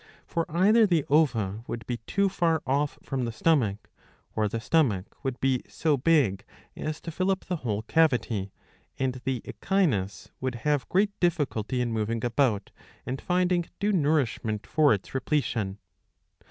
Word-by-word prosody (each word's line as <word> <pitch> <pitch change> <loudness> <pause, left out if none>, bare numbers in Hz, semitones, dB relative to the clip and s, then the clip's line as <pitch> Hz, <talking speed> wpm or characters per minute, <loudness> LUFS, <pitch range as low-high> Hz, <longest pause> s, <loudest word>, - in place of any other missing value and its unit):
For 165 -1 -2
either 205 +7 +5
the 170 -6 +2
ova 115 -9 +2
would 115 -2 -5
be 120 - -3
too 200 0 +2
far 170 -4 +1
off 140 +2 0
from 130 -3 -2
the 115 - -3
stomach, 110 -6 +1 0.4
or 110 -1 +2
the 115 +3 -3
stomach 115 - +1
would 130 -2 -3
be 130 -2 +1
so 155 -3 +1
big 135 - +2 0.3
as 155 0 -4
to 165 - -6
fill 185 +4 -1
up 190 -1 +1
the 180 - -2
whole 110 -7 -2
cavity, 120 -10 +1 0.5
and 130 -1 -2
the 130 -3 -1
Echinus 130 - -1
would 130 -1 -2
have 145 -5 +1
great 200 +3 +3
difficulty 140 - 0
in 120 -1 -1
moving 115 +1 -1
about, 120 -5 +1 0.3
and 130 +1 -4
finding 180 -1 +1
due 205 +1 +1
nourishment 140 - 0
for 155 -2 +3
its 100 - -1
repletion. 125 -8 -1
135 Hz, 155 wpm, -27 LUFS, 115-165 Hz, 0.5 s, either